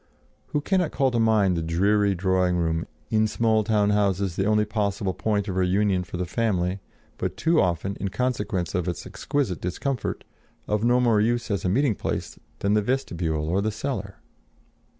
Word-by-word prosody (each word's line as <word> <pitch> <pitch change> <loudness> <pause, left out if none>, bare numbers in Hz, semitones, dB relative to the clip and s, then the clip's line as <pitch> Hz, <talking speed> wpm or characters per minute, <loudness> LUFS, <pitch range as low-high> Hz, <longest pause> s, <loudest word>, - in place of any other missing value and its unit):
Who 150 - -1
cannot 180 0 +1
call 135 -4 +1
to 120 - 0
mind 110 -5 +3
the 85 - -1
dreary 100 +5 +2
drawing 90 0 +1
room, 80 -1 -1 0.2
in 110 0 +3
small 110 0 +2
town 105 -1 +2
houses 100 -3 +1
the 95 - 0
only 105 0 +3
possible 100 -2 -1
point 105 -1 -1
of 95 -2 -3
reunion 95 0 +2
for 90 - -6
the 90 - -1
family, 95 -2 0 0.4
but 95 0 -3
too 165 0 +3
often, 90 +2 -1
in 100 - -3
consequence 115 -7 -2
of 90 -1 -1
its 85 -3 -3
exquisite 130 - -2
discomfort, 115 +7 -3 0.4
of 105 0 0
no 120 +1 +4
more 115 -4 +3
use 120 +1 0
as 100 -4 -1
a - - +2
meeting 130 +4 +2
place - - -4 0.2
than 100 +1 0
the 105 - +3
vestibule 85 - -1
or 95 +4 +1
the 110 - 0
cellar? 105 -5 -4
100 Hz, 180 wpm, -25 LUFS, 90-110 Hz, 0.4 s, no